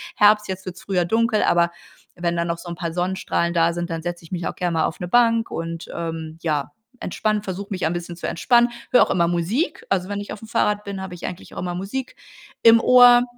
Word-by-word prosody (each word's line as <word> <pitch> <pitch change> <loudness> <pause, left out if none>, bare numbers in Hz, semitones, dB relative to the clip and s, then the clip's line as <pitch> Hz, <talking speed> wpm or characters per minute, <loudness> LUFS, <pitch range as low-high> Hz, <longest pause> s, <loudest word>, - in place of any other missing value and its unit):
Herbst, 210 0 +5
jetzt 190 0 -5
wird's 185 0 -7
früher 180 -3 0
dunkel, 225 +2 +2
aber 170 0 +3 0.5
wenn 170 0 -1
dann 170 0 0
noch 170 0 -2
so 175 +1 -9
'n 170 - -5
paar 170 0 -4
Sonnenstrahlen 180 -1 -1
da 170 0 +3
sind, 175 +1 -4
dann 165 -1 -4
setze 175 0 -5
ich 165 - -15
mich 175 -2 -3
auch - - -4
gern 175 -2 -1
mal 160 -1 +2
auf 160 - -4
'ne 180 - -4
Bank 230 +2 +3
und, 165 0 -5
ähm, 160 -1 -5
ja, 150 -3 -1 0.3
entspanne 215 +3 -1
versuche 195 0 -5
mich 185 -4 -2
ein 160 - +1
bisschen 175 0 -5
zu 170 - -7
entspannen. 240 +6 +3 0.2
Höre 250 - +7
auch - - -4
immer 170 -2 +2
Musik, 175 - -1
also, 185 -2 0
wenn 205 0 -3
ich 205 - -8
aufm 225 - -10
Fahrrad 210 -1 0
bin, 200 -1 -5
habe 190 -1 -6
ich 175 - -8
eigentlich 180 - -8
auch - - -6
immer 175 -1 -3
Musik 205 +8 -5 0.5
im 230 0 +8
Ohr. 245 -1 +7
180 Hz, 240 wpm, -22 LUFS, 170-210 Hz, 0.5 s, im